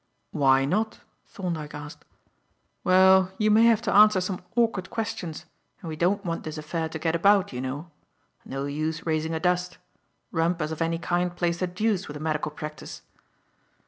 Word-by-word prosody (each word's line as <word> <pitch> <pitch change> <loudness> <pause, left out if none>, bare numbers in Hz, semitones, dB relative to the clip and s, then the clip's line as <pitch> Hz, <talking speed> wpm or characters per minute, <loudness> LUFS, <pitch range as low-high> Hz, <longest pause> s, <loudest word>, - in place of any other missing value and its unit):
"Why 135 -2 +3
not?" 215 +9 -1 0.3
Thorndyke 165 -6 -5
asked. 150 0 -9 0.8
"Well, 190 0 +5
you 215 0 +2
may 220 +2 +6
have 230 -1 +4
to 215 - 0
answer 210 -1 +7
some 185 0 -3
awkward 225 -6 +1
questions, 220 -8 -4 0.3
and 165 - -7
we 155 - -4
don't 190 +5 0
want 165 -1 -3
this 155 0 -6
affair 160 +1 -3
to 160 - -5
get 160 +1 -1
about, 200 0 +3
you 125 - -4
know. 145 +6 -5 0.5
No 135 +1 -4
use 155 +3 -3
raising 160 0 -1
a - - -1
dust. 180 +1 0 0.5
Rumpus 165 -1 0
of 160 - -5
any 165 0 +1
kind 175 +1 -1
plays 170 -1 -1
the 185 - 0
deuce 195 +2 -1
with 150 - -7
a - - -10
medical 155 -1 -1
practice." 150 0 -8
170 Hz, 175 wpm, -26 LUFS, 155-190 Hz, 0.8 s, answer